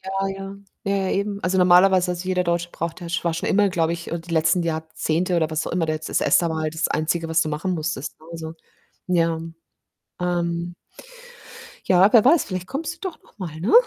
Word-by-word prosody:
Ja, 195 +1 -2
ja. 195 0 -6 0.3
Ja, 200 0 +1
ja, 190 -1 -1
eben. 200 0 -1
Also, 185 +1 +1
normalerweise 180 0 +5
also, 175 +1 -6
jeder 180 -1 +1
Deutsche 170 0 -1
braucht 170 +2 -5
ja 175 - -7
sch 175 +1 -2
war 165 -1 +1
schon 170 - -2
immer, 205 0 +4
glaube 165 -2 0
ich, 170 0 -6
äh, 170 - -2
die 165 +1 -9
letzten 160 +2 +3
Jahrzehnte 160 +2 -1
oder 160 -2 +1
was 155 0 -2
auch - - -4
immer 170 -2 0
da 155 - 0
jetzt 155 +1 -4
das - - +1
ESTA 170 - +3
war 160 0 -2
halt 155 +1 -2
das 160 - 0
Einzige, 165 +2 -1
was 160 +1 +3
du 155 - -3
machen 155 +5 -2
musstest, 160 -3 -3
ne? 160 - -16
Also, 160 -1 -6 0.6
ja. 165 -2 +2 0.8
Ähm 175 -1 -1 1.1
ja, 190 +4 +5
wer 230 -2 +7
weiß, 310 +5 +5
vielleicht 185 -2 -5
kommst 310 +4 -3
du - - -23
doch 345 - -12
noch - - -25
mal, 165 -5 -6
ne? 190 - 0
175 Hz, 225 wpm, -23 LUFS, 165-190 Hz, 1.1 s, wer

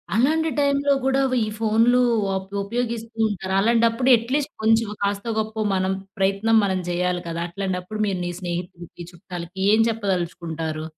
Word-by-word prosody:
అలాంటి 315 +7 +2
టైంలో 280 0 +2
గూడా 270 +1 +2 0.2
ఈ - - -5
ఫోనులు 225 +3 +3 0.3
వాపో 190 +1 -3
ఉపయోగిస్తూ 230 0 -4
ఉంటారు. 190 -2 -4
అలాంటప్పుడు 230 +3 +2
అట్లీస్ట్ 270 +6 -2
కొంచెం, 225 0 +3 0.2
కాస్తో, 200 +3 -1
గొప్పో 220 0 -2
మనం 185 0 0 0.3
ప్రయత్నం 200 +4 +2
మనం 190 -2 0
జేయాలి 180 0 0
గదా! 170 0 -3
అట్లాంటప్పుడు 190 +2 -4
మీరు 190 -2 -1
మీ 175 - -2
స్నేహితులకి, 175 -1 -6
చుట్టాలకి 175 0 -9
ఏం 220 - +5
చెప్పదలుచుకుంటారు? 170 -6 -3
200 Hz, 135 wpm, -23 LUFS, 180-230 Hz, 0.3 s, ఏం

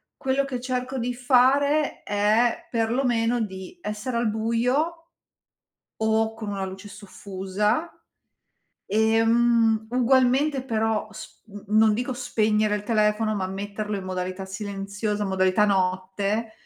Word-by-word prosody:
quello 270 +1 0
che 255 -3 -5
cerco 255 +1 -3
di 245 0 -2
fare 275 +4 +2
è, 210 +3 +1
perlomeno, 235 0 +1
di 190 - -6
essere 210 +4 -4
al 235 -1 +1
buio 250 +10 -1 0.9
o 220 0 +1
con 225 -1 -8
una 200 -1 -3
luce 190 +2 -7
soffusa. 205 - -3 1.0
E, 220 +2 +2
mhmm, 230 -1 +3
ugualmente 260 +3 +2
però 220 -3 -1
sp 215 - -12
n 205 -1 -11
non 220 -1 +6
dico 245 +4 -2
spegnere 215 -4 +1
il 205 - -7
telefono, 215 0 +1
ma 190 -2 -2
metterlo 205 +2 -4
in 195 - -6
modalità 185 +1 -4
silenziosa, 205 +1 -4
modalità 190 +1 +2
notte, 195 +3 0
220 Hz, 120 wpm, -25 LUFS, 205-245 Hz, 1.0 s, non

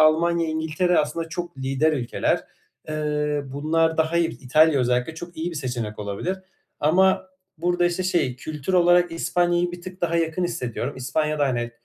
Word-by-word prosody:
Almanya, 165 +2 +4
İngiltere 160 +3 +1
aslında 165 +2 -1
çok 175 -3 -6
lider 135 +4 +1
ülkeler. 125 -5 0 0.4
Iıı, 150 -2 -1
bunlar 160 +3 +1
da 160 +1 +1
hayır, 170 -8 +1
İtalya 145 +2 +4
özellikle 125 +5 0
çok 175 +2 -9
iyi 165 +2 -2
bir 165 - -6
seçenek 120 -6 -4
olabilir 105 - -3 0.4
ama 190 +5 +3 0.3
burada 175 +1 +2
işte 175 +1 -1
şey, 170 -9 0
kültür 150 +5 -5
olarak 175 -1 +4
İspanya'yı 175 +1 +1
bir 175 - -7
tık 185 +1 -9
daha 170 -1 +1
yakın 165 +2 0
hissediyorum. 135 -6 -3
İspanya 150 +4 -1
da, 145 - +3
hani, 120 -2 -1
160 Hz, 160 wpm, -24 LUFS, 140-175 Hz, 0.4 s, Almanya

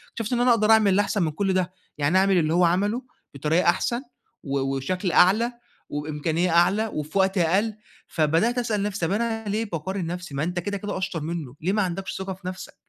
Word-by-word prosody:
شُفت 225 +1 -3
إن 240 - +1
أنا 250 - +4
أقدر 220 -2 +4
أعمل 215 -3 +5
الأحسن 205 0 +1
من 155 - 0
كل 195 +5 0
ده، 185 -1 0 0.2
يعني 150 +5 +2
أعمل 190 0 +4
اللي 160 -2 +2
هو 175 +1 +4
عَمَله 200 +8 +1 0.3
بطريقة 155 +5 +2
أحسن، 235 +7 0 0.4
و 140 -1 -1
وشكل 135 +8 -1
أعلى 215 +9 +4 0.4
وبإمكانية 155 +4 -1
أعلى 180 +6 +3
وفي 155 -3 -4
وقت 190 +1 +2
أقل، 190 +6 +2 0.3
فبدأت 165 +10 +1
أسأل 225 -4 0
نفسي 205 -4 -2
طب 165 - -2
أنا 225 +1 -1
ليه 215 +3 -1
باقارن 190 0 -4
نفسي 175 -3 -6
ما 140 - -1
أنت 175 +2 -2
كده 200 +3 -3
كده 205 0 -4
أشطر 185 -3 -3
منه، 155 -5 -5
ليه 180 +5 0
ما 210 - +2
عندكش 190 0 -3
ثقة 190 0 -4
في 185 0 -10
نفسك؟ 185 0 -7
185 Hz, 205 wpm, -24 LUFS, 165-205 Hz, 0.4 s, أعمل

